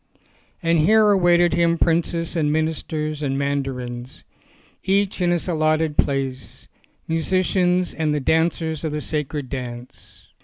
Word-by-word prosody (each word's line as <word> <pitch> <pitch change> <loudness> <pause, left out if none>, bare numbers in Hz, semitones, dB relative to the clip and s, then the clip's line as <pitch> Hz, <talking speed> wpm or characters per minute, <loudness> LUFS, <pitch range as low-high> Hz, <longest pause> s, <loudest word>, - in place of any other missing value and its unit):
And 165 0 +2
here 215 +6 +5
awaited 175 -3 +4
him 170 0 +2
princes 165 +1 0
and 150 -3 +1
ministers 155 -1 -2
and 135 -2 -1
mandarins, 130 -3 -4 0.6
each 195 0 0
in 175 - +2
his 175 0 0
allotted 155 -2 +1
place, 135 -2 -2 0.4
musicians 180 +2 +1
and 155 -1 -1
the 150 - 0
dancers 160 +1 0
of 155 -2 -2
the 150 - -2
sacred 150 -2 -3
dance. 125 -2 -9
160 Hz, 125 wpm, -22 LUFS, 140-175 Hz, 0.6 s, here